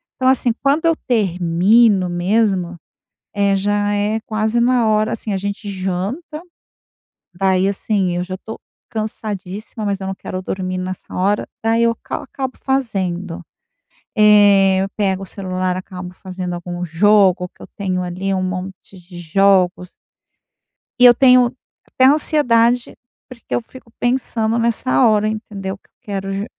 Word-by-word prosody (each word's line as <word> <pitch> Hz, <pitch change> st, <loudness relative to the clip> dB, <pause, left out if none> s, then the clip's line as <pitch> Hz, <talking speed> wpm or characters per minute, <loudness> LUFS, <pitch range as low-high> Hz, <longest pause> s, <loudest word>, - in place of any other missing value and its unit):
Então 255 Hz, -, 0 dB
assim, 260 Hz, -2 st, +3 dB
quando 285 Hz, +4 st, +2 dB
eu 330 Hz, 0 st, +4 dB
termino 195 Hz, -1 st, +3 dB
mesmo, 180 Hz, 0 st, 0 dB, 0.6 s
é, 200 Hz, -1 st, +2 dB
já 205 Hz, +1 st, 0 dB
é 205 Hz, +2 st, 0 dB
quase 220 Hz, +2 st, 0 dB
na 245 Hz, -1 st, +3 dB
hora 215 Hz, +1 st, +1 dB
assim, 225 Hz, -1 st, -4 dB
a -, -, 0 dB
gente 200 Hz, +2 st, -5 dB
janta, 200 Hz, -, -4 dB, 0.9 s
daí 190 Hz, +1 st, +2 dB
assim, 195 Hz, -3 st, -1 dB
eu 175 Hz, -, -1 dB
já 185 Hz, +1 st, -6 dB
estou 220 Hz, +4 st, -8 dB, 0.3 s
cansadíssima, 215 Hz, -1 st, -5 dB
mas 200 Hz, -1 st, -2 dB
eu 190 Hz, -, -5 dB
não 195 Hz, -, -3 dB
quero 185 Hz, -1 st, -6 dB
dormir 185 Hz, 0 st, -4 dB
nessa 185 Hz, 0 st, -6 dB
hora, 200 Hz, +3 st, 0 dB, 0.2 s
daí 225 Hz, +1 st, +2 dB
eu 230 Hz, 0 st, +3 dB
ca -, -, -5 dB
acabo 265 Hz, -2 st, -6 dB
fazendo, 190 Hz, -10 st, -2 dB, 0.7 s
eh, 205 Hz, -3 st, +5 dB
eu 195 Hz, -, -2 dB
pego 195 Hz, -2 st, 0 dB
o -, -, -7 dB
celular, 185 Hz, -1 st, -3 dB
acabo 185 Hz, -1 st, -8 dB
fazendo 185 Hz, -1 st, -6 dB
algum 175 Hz, 0 st, -5 dB
jogo 185 Hz, +1 st, +3 dB
que -, -, -19 dB
eu -, -, -11 dB
tenho 185 Hz, -2 st, -2 dB
ali 185 Hz, +2 st, -3 dB
um 185 Hz, -, -1 dB
monte 185 Hz, +1 st, -6 dB
de 175 Hz, 0 st, -13 dB
jogos. 180 Hz, +1 st, +2 dB, 1.1 s
E -, -, +4 dB
eu 245 Hz, -, +10 dB
tenho 250 Hz, -1 st, +5 dB, 0.3 s
até 260 Hz, -, +1 dB
ansiedade, 250 Hz, -5 st, +3 dB, 0.3 s
porque 250 Hz, -3 st, -10 dB
eu -, -, +1 dB
fico 235 Hz, 0 st, -16 dB
pensando 235 Hz, -2 st, 0 dB
nessa 225 Hz, -, +2 dB
hora, 215 Hz, -1 st, +3 dB
entendeu 200 Hz, -3 st, -5 dB
que -, -, -40 dB
eu -, -, -56 dB
quero 195 Hz, -4 st, -4 dB
jo 200 Hz, +1 st, -3 dB
200 Hz, 150 wpm, -18 LUFS, 185-225 Hz, 1.1 s, eu